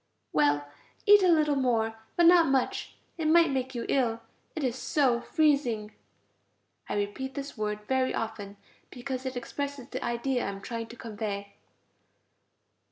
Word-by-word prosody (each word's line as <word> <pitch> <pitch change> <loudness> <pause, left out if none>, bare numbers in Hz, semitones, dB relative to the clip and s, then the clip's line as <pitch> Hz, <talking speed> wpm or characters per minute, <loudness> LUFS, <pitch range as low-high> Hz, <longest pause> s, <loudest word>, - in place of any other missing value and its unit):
Well, 145 -1 +2 0.4
eat 415 -1 +8
a 370 - +4
little 305 -4 +4
more, 225 -4 0 0.2
but 345 - +4
not 340 -1 +7
much, 270 -2 0 0.2
it 315 - 0
might 330 -1 +5
make 260 -1 -2
you 235 - -3
ill. 235 -4 +1 0.3
It 315 - -3
is 250 -3 0
so 260 -3 +1
freezing 265 -10 +1 1.0
(I - - -1
repeat 205 +7 -3
this 280 0 -6
word 210 -1 -3
very 260 -1 +1
often, 205 -2 -5 0.3
because 260 +1 -5
it 255 -1 -4
expresses 280 +1 -5
the - - -5
idea 240 +1 -1
I - - -2
am 195 0 -6
trying 230 +1 -5
to 235 - -11
convey). 205 -3 -5
250 Hz, 155 wpm, -28 LUFS, 220-280 Hz, 1.0 s, eat